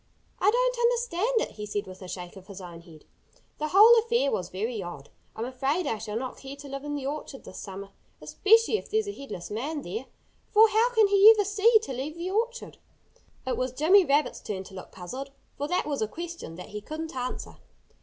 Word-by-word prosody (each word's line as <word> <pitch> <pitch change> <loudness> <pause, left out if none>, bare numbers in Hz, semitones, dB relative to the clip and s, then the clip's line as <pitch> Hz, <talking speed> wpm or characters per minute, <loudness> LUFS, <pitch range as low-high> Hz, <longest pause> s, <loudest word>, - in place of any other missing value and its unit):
"I 390 - +4
don't - - +1
understand 470 -1 +1
it," - - -3
he 210 0 -5
said 205 0 -2
with 185 0 -11
a 185 - -8
shake 180 0 -7
of 190 0 -13
his 200 -2 -9
own 175 -2 -9
head. 160 -3 -16 0.5
"The 305 - -1
whole 435 +7 +8
affair 465 -10 +1
was 180 -1 -2
very 215 +4 -3
odd. 175 -6 -8 0.3
I'm 225 - -3
afraid 270 +7 -1
I 225 -6 -1
shall 215 0 -4
not 255 +1 -5
care 270 +1 -8
to 285 0 -11
live 275 0 -6
in 295 0 -3
the 280 -2 -4
orchard 280 -1 -5
this - - -10
summer, 195 0 -8 0.3
especially 445 +1 +3
if - - -13
there's 435 0 0
a - - -2
headless 205 - -8
man 285 +8 -3
there! 220 +9 -5 0.4
For 440 +1 +6
how 445 +3 +3
can 440 -2 +6
he 400 +2 +8
ever 410 - +2
see 420 +3 +5
to 270 - -5
leave 275 +5 -4
the 355 +2 -3
orchard?" 475 +4 -2 0.7
It 260 - -1
was 255 0 -2
Jimmy 360 +9 +5
Rabbit's 295 -1 +1
turn 190 -3 -4
to 190 - -14
look 185 - -9
puzzled, 255 +10 -7 0.3
for 290 - -3
that 360 +3 0
was 285 -4 -2
a 215 - +1
question 335 - -7
that 180 +4 -9
he 210 0 -6
couldn't 315 +5 -6
answer. 255 0 -5
280 Hz, 220 wpm, -27 LUFS, -, 0.7 s, whole